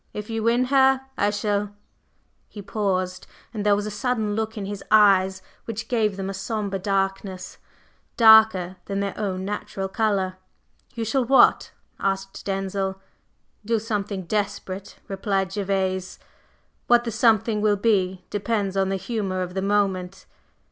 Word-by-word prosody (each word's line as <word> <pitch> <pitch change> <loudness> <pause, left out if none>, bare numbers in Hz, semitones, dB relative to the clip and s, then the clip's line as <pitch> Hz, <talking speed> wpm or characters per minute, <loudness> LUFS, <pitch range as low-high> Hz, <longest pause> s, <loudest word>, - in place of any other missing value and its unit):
If 210 +2 -6
you 225 0 -2
win 235 +3 +3
her, 265 -1 +5
I 205 - +2
shall 205 0 -1 0.4
…" - - -44 0.3
He 205 - -10
paused, 185 -3 -2 0.3
and 210 -3 -3
there 205 -1 +4
was 205 0 -2
a 210 - -4
sudden 215 0 -1
look 220 +1 -3
in 200 - -4
his 200 0 -6
eyes 190 -3 +4 0.2
which 225 -1 -5
gave 215 -5 0
them 190 -1 -3
a 195 - -3
sombre 195 0 -3
darkness, 195 -1 -2 0.6
darker 220 -5 +6
than 195 0 -3
their 200 0 -2
own 190 -3 -3
natural 195 -1 -4
color. 190 -3 0 0.6
"You 230 -1 -3
shall 260 +4 +1
what?" 265 +3 +5 0.3
asked 195 0 -2
Denzil. 195 0 -2 0.6
"Do 230 +2 +1
something 205 -3 -3
desperate," 200 0 -4
replied 195 -1 -1
Gervase. 190 -2 -2 0.7
"What 240 0 +5
the 235 - -3
something 220 -1 +2
will 210 -1 +3
be 190 -4 +1
depends 205 -2 -1
on 195 -1 +1
the 195 - 0
humor 190 -2 -2
of 180 0 -7
the 190 - -2
moment. 195 -2 -1
200 Hz, 150 wpm, -24 LUFS, 190-215 Hz, 0.7 s, darker